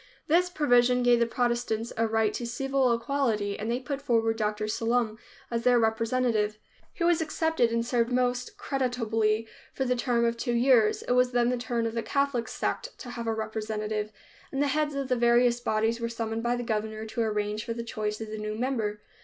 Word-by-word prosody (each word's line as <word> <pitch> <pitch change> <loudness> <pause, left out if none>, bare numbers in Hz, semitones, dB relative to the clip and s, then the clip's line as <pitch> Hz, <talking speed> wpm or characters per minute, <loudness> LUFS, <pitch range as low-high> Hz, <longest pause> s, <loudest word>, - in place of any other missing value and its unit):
This 355 +3 +3
provision 250 -6 +3
gave 245 -1 +5
the 235 - +2
Protestants 235 -1 -1
a 225 0 +1
right 220 -1 +1
to 240 - -4
civil 270 +1 +1
equality 230 -4 0
and 215 +2 -3
they 240 +1 0
put 270 +2 -4
forward 225 -4 +1
Dr. 215 -1 -1
Sallum 225 0 0 0.3
as 230 0 0
their 250 -1 +5
representative. 225 -1 +1 0.3
He 340 - -4
was 340 -1 +3
accepted, 320 -5 +1
and 230 0 0
served 235 0 +1
most 250 0 0
creditably 225 -5 0 0.3
for 265 - -1
the 250 0 +1
term 240 -1 +1
of 235 0 0
two 240 +1 -1
years. 235 -3 +4
It - - -3
was 250 0 +3
then 240 0 +3
the 250 - +1
turn 235 -1 -2
of 225 - -2
the 230 - -1
Catholic 275 -3 0
sect - - -3
to 245 - -8
have 235 -1 -5
a 225 - +1
representative, 215 -1 -3 0.4
and 270 - -3
the 285 0 +2
heads 295 +1 0
of 275 -1 -2
the 255 - +1
various 240 0 +4
bodies 225 0 0
were 230 0 -2
summoned 225 -1 -3
by 240 +1 +1
the 245 - -3
governor 220 -1 -3
to 220 +1 -3
arrange 210 -1 -1
for 230 - -3
the 230 0 -5
choice 215 -2 -3
of 220 -1 -6
the 215 - -5
new 215 0 -3
member. 220 -4 -2
235 Hz, 205 wpm, -28 LUFS, 220-250 Hz, 0.4 s, gave